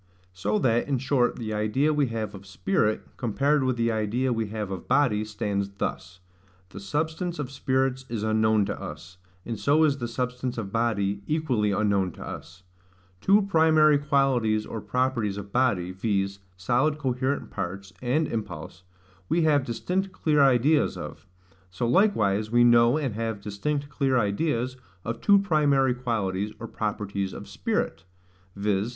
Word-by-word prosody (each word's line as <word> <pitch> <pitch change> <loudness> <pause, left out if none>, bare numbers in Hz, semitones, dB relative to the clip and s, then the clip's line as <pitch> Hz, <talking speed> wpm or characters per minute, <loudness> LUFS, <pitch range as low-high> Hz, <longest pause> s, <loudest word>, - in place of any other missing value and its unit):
So 100 +4 -1
that, 120 -1 +1
in 140 -2 +1
short, 130 -1 +1
the 110 -3 -4
idea 110 +9 +1
we 145 -2 +2
have 110 -3 -4
of 95 0 -11
spirit, 95 +3 0
compared 140 +5 +1
with 130 -1 0
the 115 0 +1
idea 115 +4 0
we 115 -2 -2
have 105 -2 -4
of 95 -3 -6
body, 125 -6 +2
stands 105 -2 -2
thus: 90 -1 -4 0.5
the 95 - -9
substance 160 - -2
of 140 -3 -4
spirits 130 -1 0
is 115 -2 -3
unknown 110 -1 +2
to - - -5
us; 80 +4 -9 0.3
and 115 -3 -4
so 150 +3 +3
is 140 -3 +2
the 120 - -2
substance 125 +1 -3
of 100 -4 -4
body 100 -3 0
equally 135 -9 +1
unknown 100 -2 +1
to - - -9
us. 90 +3 -9 0.6
Two 200 - +4
primary 160 -5 +4
qualities 130 -7 +1
or 110 - -6
properties 125 -6 -1
of 100 0 -8
body, 105 -8 +1
viz. 100 0 -1 0.2
solid 125 +10 +1
coherent 130 0 -2
parts 95 0 -5
and 140 +5 +1
impulse, 110 -5 -6 0.5
we 170 0 +2
have 150 -3 +3
distinct 180 - -2
clear 155 -5 +2
ideas 140 +3 +3
of: - - -8 0.4
so 95 +6 -2
likewise 110 - +2
we 120 +1 +4
know, 120 +2 +5
and 140 -7 -2
have 110 -1 -3
distinct 140 +9 -3
clear 135 -3 +1
ideas, 120 +4 0 0.3
of 115 0 -4
two 200 -1 +6
primary 145 -8 +3
qualities 105 -5 -2
or 115 - -6
properties 100 -3 -3
of - - -8
spirit, 80 0 -2 0.5
viz. 100 +1 0
115 Hz, 155 wpm, -26 LUFS, 105-140 Hz, 0.6 s, two